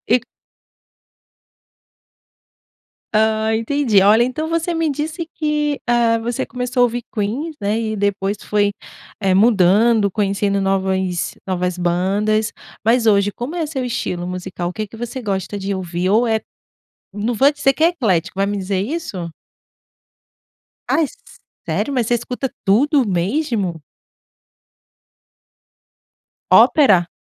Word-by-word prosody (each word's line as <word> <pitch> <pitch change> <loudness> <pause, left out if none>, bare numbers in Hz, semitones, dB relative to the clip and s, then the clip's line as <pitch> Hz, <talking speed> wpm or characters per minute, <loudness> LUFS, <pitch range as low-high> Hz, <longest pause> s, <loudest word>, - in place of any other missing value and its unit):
E - - +3
c - - -22 2.9
Ah, 220 0 +2
entendi, 230 -2 +2
olha, 210 +4 +5
então 255 +6 -2
você 330 +1 -1
me 325 -1 0
disse 310 +4 -4
que, 300 -2 -1
ah, 235 -1 +3
você 235 +1 -2
começou 250 0 -4
a - - +7
ouvir 240 0 0
Queen, 255 +10 -3
né, 205 +2 0
e 220 -1 -2
depois 200 0 -1
foi 205 -1 +1 0.5
eh, 195 -3 +1
mudando, 210 +1 +4
conhecendo 200 0 0
novas 190 -2 -1
novas 180 -1 -2
bandas. 200 +5 0 0.3
Mas 230 +1 +3
hoje, 200 -1 +4
como 245 +7 -5
é 330 - 0
seu 285 -4 -4
estilo 180 -7 -3
musical? 180 -1 -4
O - - -8
que 215 +1 -4
que 215 - -13
você 240 +3 -5
gosta 200 -1 -3
de 195 0 -2
ouvir, 180 0 -2
ou 220 +5 +3
é 220 -1 +1 0.7
não 210 +4 -2
vou 270 +5 +5
dizer 285 -2 +2
que 310 - -4
é 330 - +7
eclético, 190 - -1
vai 195 - +2
me 205 +1 -2
dizer 190 -1 -2
isso? 210 - -4 1.6
Ai 325 - +2 0.6
sério, 285 - -1
mas 245 -4 0
você 240 - +2
escuta 250 +2 -4
tudo 260 +6 +3
mesmo? 195 - -1 2.7
Ópera? 195 - +5
220 Hz, 130 wpm, -19 LUFS, 195-255 Hz, 2.9 s, a